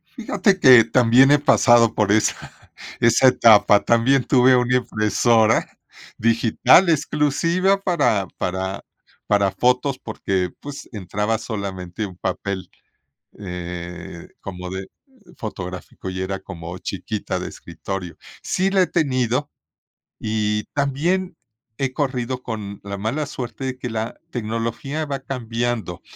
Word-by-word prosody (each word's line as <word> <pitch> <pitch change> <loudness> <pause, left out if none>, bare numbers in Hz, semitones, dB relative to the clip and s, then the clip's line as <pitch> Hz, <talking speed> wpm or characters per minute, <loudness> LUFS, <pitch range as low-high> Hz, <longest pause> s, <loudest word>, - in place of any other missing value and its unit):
Fíjate 200 -4 +1
que, 125 -6 +8
también 125 +3 +4
he 145 - +5
pasado 120 -5 +4
por 105 -2 +1
esa 110 +1 0 0.5
esa 115 +3 +5
etapa, 110 -4 +5
también 125 +3 +3
tuve 130 -1 +5
una 125 +1 +2
impresora 110 0 +2 0.5
digital 115 - +4
exclusiva 165 +6 +1
para 120 - +1
para 95 +1 -3 0.4
para 100 -2 +2
fotos, 125 +6 +1
porque, 95 -6 -2
pues, 145 -1 -9
entraba 105 +2 -2
solamente 100 -2 -5
un 90 -3 -10
papel, 100 -1 -4 0.7
eh, 90 -2 -7
como 90 -2 -7
de 95 +1 -6 0.5
fotográfico 90 -3 -7
y 95 0 -4
era 95 +1 -3
como 85 -2 -8
chiquita 100 +3 -4
de - - -5
escritorio, 95 -3 -7 0.3
sí 190 +1 0
la 190 -1 +3
he - - -1
tenido 135 -3 0 0.7
y 105 -1 -1
también 160 +6 -1 0.4
he 135 -2 -1
corrido 130 -3 -2
con 105 -3 -6
la 100 0 -5
mala 130 +9 -2
suerte 125 -2 -6
de 130 -1 -4
que 125 -2 -5
la 110 +1 -4
tecnología 115 +6 -3
va 140 -2 -4
cambiando, 120 -7 -3
115 Hz, 120 wpm, -21 LUFS, 100-135 Hz, 0.7 s, que